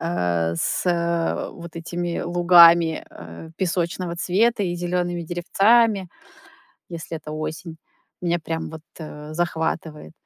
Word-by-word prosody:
э, 85 Hz, -, 0 dB
с -, -, -1 dB, 0.7 s
вот 170 Hz, -1 st, -11 dB
этими 175 Hz, +1 st, -3 dB
лугами, 170 Hz, -2 st, +5 dB
э, 85 Hz, -, -11 dB
песочного 175 Hz, -1 st, -2 dB
цвета 205 Hz, +5 st, +1 dB
и 175 Hz, -, -2 dB
зелёными 175 Hz, 0 st, -2 dB
деревцами, 195 Hz, +4 st, +2 dB, 0.8 s
если 165 Hz, -1 st, -6 dB
это 150 Hz, -, -10 dB
осень. 160 Hz, +2 st, -5 dB, 0.5 s
Меня 175 Hz, -1 st, 0 dB
прям 165 Hz, 0 st, -4 dB
вот, 160 Hz, -1 st, -9 dB, 0.2 s
э, 150 Hz, -1 st, -9 dB
захватывает. 160 Hz, -2 st, -3 dB
170 Hz, 110 wpm, -23 LUFS, 160-175 Hz, 0.8 s, лугами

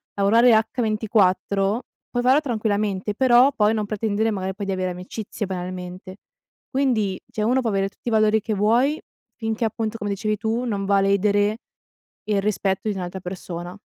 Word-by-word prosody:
lavorare 225 Hz, +5 st, +5 dB
h24, 215 Hz, -2 st, +1 dB, 0.3 s
puoi 245 Hz, -, 0 dB
faro 265 Hz, +4 st, +5 dB
tranquillamente 210 Hz, -5 st, -1 dB
però 255 Hz, +2 st, +5 dB
poi 215 Hz, -3 st, +3 dB
non 215 Hz, -2 st, -1 dB
pretendere 215 Hz, +1 st, 0 dB
magari 190 Hz, -2 st, -3 dB
poi 200 Hz, -, -5 dB
di 195 Hz, -, 0 dB
avere 185 Hz, -1 st, -2 dB
amicizie 195 Hz, +4 st, -6 dB
banalmente. 185 Hz, 0 st, -6 dB, 0.5 s
Quindi, 235 Hz, -8 st, 0 dB
cioè 215 Hz, -, -2 dB
uno 250 Hz, +4 st, +2 dB
può 230 Hz, -, -1 dB
avere 195 Hz, 0 st, 0 dB
tutti 235 Hz, -, -7 dB
i -, -, -3 dB
valori 215 Hz, 0 st, +4 dB
che 220 Hz, -, -2 dB
vuoi, 240 Hz, +9 st, +2 dB, 0.4 s
finché 225 Hz, 0 st, -2 dB
appunto 225 Hz, 0 st, -2 dB
come 205 Hz, -1 st, -4 dB
dicevi 210 Hz, +1 st, -1 dB
tu 225 Hz, +3 st, -1 dB
non 200 Hz, -4 st, -2 dB
va 200 Hz, 0 st, +3 dB
a -, -, +3 dB
ledere 205 Hz, +2 st, +2 dB, 0.7 s
il 205 Hz, -2 st, +1 dB
rispetto 195 Hz, 0 st, -1 dB
di 205 Hz, -, -2 dB
un'altra 185 Hz, 0 st, -5 dB
persona. 180 Hz, -1 st, -6 dB
210 Hz, 170 wpm, -23 LUFS, 195-225 Hz, 0.7 s, lavorare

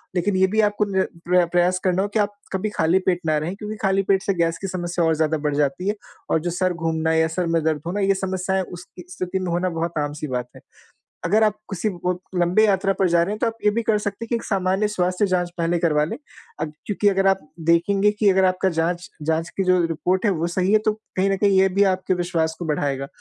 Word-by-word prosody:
लेकिन 185 Hz, +2 st, +1 dB
ये 190 Hz, 0 st, +4 dB
भी 215 Hz, +3 st, +2 dB
आपको 210 Hz, 0 st, +1 dB
नि 190 Hz, -, +3 dB, 0.3 s
प्र 180 Hz, -1 st, +4 dB
प्रयास 175 Hz, +1 st, +3 dB
करना 185 Hz, 0 st, +2 dB
हो 200 Hz, -, 0 dB
कि 215 Hz, -, -1 dB
आप 205 Hz, 0 st, +1 dB, 0.2 s
कभी 190 Hz, +3 st, -1 dB
खाली 165 Hz, +4 st, +3 dB
पेट 175 Hz, -1 st, +2 dB
ना 155 Hz, -1 st, +2 dB
रहें 165 Hz, +6 st, -3 dB
क्योंकि 210 Hz, +1 st, -6 dB
खाली 195 Hz, -1 st, +2 dB
पेट 195 Hz, 0 st, +2 dB
से 195 Hz, -, +1 dB
गैस 165 Hz, -1 st, 0 dB
की 195 Hz, -, -3 dB
समस्या 175 Hz, -2 st, -2 dB
और 160 Hz, -, +2 dB
ज़्यादा 155 Hz, 0 st, +1 dB
बढ़ 145 Hz, -1 st, -2 dB
जाती 145 Hz, +6 st, 0 dB
है 210 Hz, -, 0 dB, 0.4 s
और -, -, +3 dB
जो 175 Hz, -, -2 dB
सर 185 Hz, +1 st, 0 dB
घूमना 160 Hz, -1 st, -1 dB
या 160 Hz, 0 st, +3 dB
सर 170 Hz, +2 st, -2 dB
में 165 Hz, -1 st, +1 dB
दर्द 155 Hz, -2 st, 0 dB
होना 200 Hz, +4 st, -2 dB
ये 195 Hz, 0 st, +3 dB
समस्याएँ 190 Hz, 0 st, -1 dB
उस 175 Hz, 0 st, -9 dB
इ -, -, -8 dB
स्थिति 185 Hz, +1 st, -3 dB
में 185 Hz, -2 st, -3 dB
होना 175 Hz, +2 st, 0 dB
बहुत 165 Hz, 0 st, -3 dB
आम-सी 145 Hz, +1 st, -3 dB
बात 125 Hz, -2 st, -3 dB
है। -, -, -13 dB, 0.6 s
अगर 210 Hz, +6 st, +3 dB
आप 210 Hz, -, +2 dB, 0.2 s
किसी 195 Hz, +3 st, -1 dB, 0.2 s
ब 180 Hz, 0 st, 0 dB, 0.2 s
लम्बी 180 Hz, +5 st, +3 dB
यात्रा 195 Hz, -1 st, +2 dB
पर 190 Hz, -2 st, +3 dB
जा 170 Hz, 0 st, +3 dB
रहे 195 Hz, +4 st, -1 dB
हैं 215 Hz, -, -4 dB
तो 235 Hz, -, 0 dB
आप 225 Hz, 0 st, -2 dB
ये 210 Hz, -, +5 dB
भी 235 Hz, -, 0 dB
कर 215 Hz, -1 st, +2 dB
सकते 210 Hz, +2 st, -4 dB
हैं -, -, -11 dB
कि 235 Hz, -, -1 dB
एक -, -, -5 dB
सामान्य 195 Hz, +1 st, 0 dB
स्वास्थ्य 185 Hz, -1 st, 0 dB
जाँच 180 Hz, -2 st, 0 dB
पहले 170 Hz, +1 st, +1 dB
करवा 155 Hz, -3 st, +2 dB
लें। 155 Hz, -, -4 dB, 0.4 s
अ, -, -, +1 dB
क्योंकि 190 Hz, +7 st, -1 dB
अगर 195 Hz, 0 st, +2 dB
आप 195 Hz, -, +3 dB, 0.3 s
देखेंगे 195 Hz, +5 st, +3 dB
कि 210 Hz, 0 st, +1 dB
अगर 190 Hz, 0 st, +3 dB
आपका 185 Hz, +1 st, +2 dB
जाँच 175 Hz, +1 st, -1 dB
जाँच 160 Hz, +2 st, 0 dB
की 195 Hz, -, 0 dB
जो 185 Hz, -1 st, +3 dB
रिपोर्ट 180 Hz, +5 st, -1 dB
है 205 Hz, -, +4 dB
वो 170 Hz, 0 st, -1 dB
सही 185 Hz, +2 st, +2 dB
है 215 Hz, -, +6 dB
तो 215 Hz, -, +4 dB, 0.2 s
कहीं 195 Hz, +1 st, +2 dB
न 195 Hz, -, +1 dB
कहीं 195 Hz, -1 st, +3 dB
ये 190 Hz, -, +4 dB
भी 200 Hz, +2 st, +1 dB
आपके 185 Hz, 0 st, -1 dB
विश्वास 170 Hz, -2 st, -1 dB
को 175 Hz, -, -5 dB
बढ़ाएगा 140 Hz, -3 st, -1 dB
180 Hz, 260 wpm, -22 LUFS, 165-195 Hz, 0.6 s, है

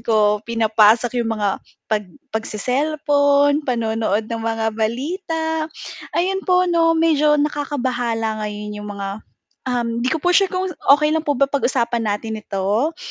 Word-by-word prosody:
ko 210 Hz, -2 st, +2 dB
pinapasok 225 Hz, +1 st, +3 dB
yung 230 Hz, -, -1 dB
mga 205 Hz, -2 st, -1 dB, 0.3 s
pag 210 Hz, -3 st, -1 dB, 0.2 s
pag-se-cellphone, 285 Hz, +5 st, +1 dB
panonood 225 Hz, -3 st, 0 dB
ng 230 Hz, +1 st, -5 dB
mga 225 Hz, 0 st, -1 dB
balita. 320 Hz, -, -2 dB, 0.5 s
Ayun 380 Hz, +2 st, +1 dB
po 365 Hz, -1 st, +3 dB
'no 330 Hz, -2 st, +3 dB
medyo 305 Hz, -2 st, +3 dB
nakakabahala 250 Hz, -7 st, -1 dB
ngayon 210 Hz, 0 st, -5 dB
yung 210 Hz, -, -7 dB
mga 200 Hz, +1 st, -5 dB, 0.5 s
um, 235 Hz, -2 st, -1 dB
hindi 250 Hz, -, 0 dB
ko 320 Hz, -, +1 dB
po 360 Hz, -, +4 dB
sure 390 Hz, +1 st, +4 dB
kung 370 Hz, 0 st, -2 dB, 0.2 s
okey 300 Hz, +1 st, +1 dB
lang 320 Hz, -, +1 dB
po 290 Hz, -3 st, -1 dB
ba 275 Hz, -, +4 dB
pag-usapan 245 Hz, -4 st, 0 dB, 0.2 s
natin 220 Hz, 0 st, -6 dB
ito? 210 Hz, +10 st, -1 dB
245 Hz, 140 wpm, -20 LUFS, 220-305 Hz, 0.5 s, po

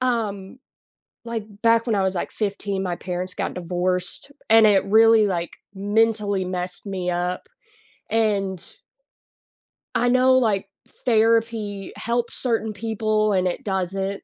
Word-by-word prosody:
Um, 220 Hz, -4 st, -2 dB, 0.7 s
like, 230 Hz, -2 st, -4 dB, 0.2 s
back 230 Hz, 0 st, +4 dB
when 230 Hz, -, +1 dB
I 195 Hz, -, +2 dB
was, 190 Hz, 0 st, 0 dB
like, 175 Hz, -, -3 dB
15, 200 Hz, -2 st, -2 dB
my 175 Hz, -2 st, -2 dB
parents 180 Hz, 0 st, -4 dB
got -, -, -3 dB
divorced 180 Hz, +6 st, -2 dB, 0.2 s
and 225 Hz, 0 st, +7 dB
it 200 Hz, -2 st, +4 dB
really, 220 Hz, +1 st, +5 dB
like, 175 Hz, -3 st, -3 dB, 0.2 s
mentally 205 Hz, -1 st, +1 dB
messed 180 Hz, +1 st, -4 dB
me 185 Hz, -2 st, -2 dB
up, 180 Hz, +1 st, -2 dB, 0.7 s
and 200 Hz, -5 st, 0 dB, 1.3 s
I 245 Hz, -, +2 dB
know, 255 Hz, +1 st, +4 dB
like, 205 Hz, -5 st, +1 dB, 0.2 s
therapy 225 Hz, -3 st, 0 dB
helps 235 Hz, +1 st, -2 dB
certain 225 Hz, -3 st, -1 dB
people 215 Hz, -1 st, 0 dB
and 185 Hz, -1 st, +2 dB
it 180 Hz, +9 st, -3 dB
doesn't, 195 Hz, -1 st, -2 dB
205 Hz, 130 wpm, -23 LUFS, 190-225 Hz, 1.3 s, and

